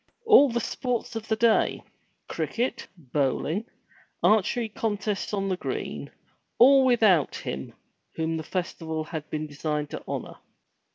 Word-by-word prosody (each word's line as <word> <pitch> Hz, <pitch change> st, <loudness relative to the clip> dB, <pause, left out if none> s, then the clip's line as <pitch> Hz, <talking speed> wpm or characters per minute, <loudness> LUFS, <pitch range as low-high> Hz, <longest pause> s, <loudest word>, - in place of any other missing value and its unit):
All 420 Hz, -11 st, +7 dB
the 235 Hz, 0 st, 0 dB
sports 245 Hz, -1 st, -3 dB
of 225 Hz, 0 st, -5 dB
the 220 Hz, -, +1 dB
day, 230 Hz, 0 st, +2 dB, 0.2 s
— -, -, -45 dB
cricket, 245 Hz, +3 st, -2 dB
bowling, 150 Hz, -, -1 dB, 0.6 s
archery 220 Hz, +2 st, +3 dB
contests 210 Hz, -2 st, -2 dB
on 195 Hz, -2 st, -1 dB
the 185 Hz, -1 st, -1 dB
green, -, -, -4 dB, 0.5 s
all 270 Hz, +2 st, +7 dB
without 215 Hz, -, +4 dB
him 65 Hz, +1 st, -6 dB, 0.4 s
whom 160 Hz, 0 st, -1 dB
the 160 Hz, -, -4 dB
festival 160 Hz, -2 st, -3 dB
had 155 Hz, -1 st, -6 dB
been 155 Hz, 0 st, -3 dB
designed 150 Hz, 0 st, -3 dB
to -, -, -6 dB
honor. -, -, -5 dB
195 Hz, 135 wpm, -26 LUFS, 155-230 Hz, 0.6 s, All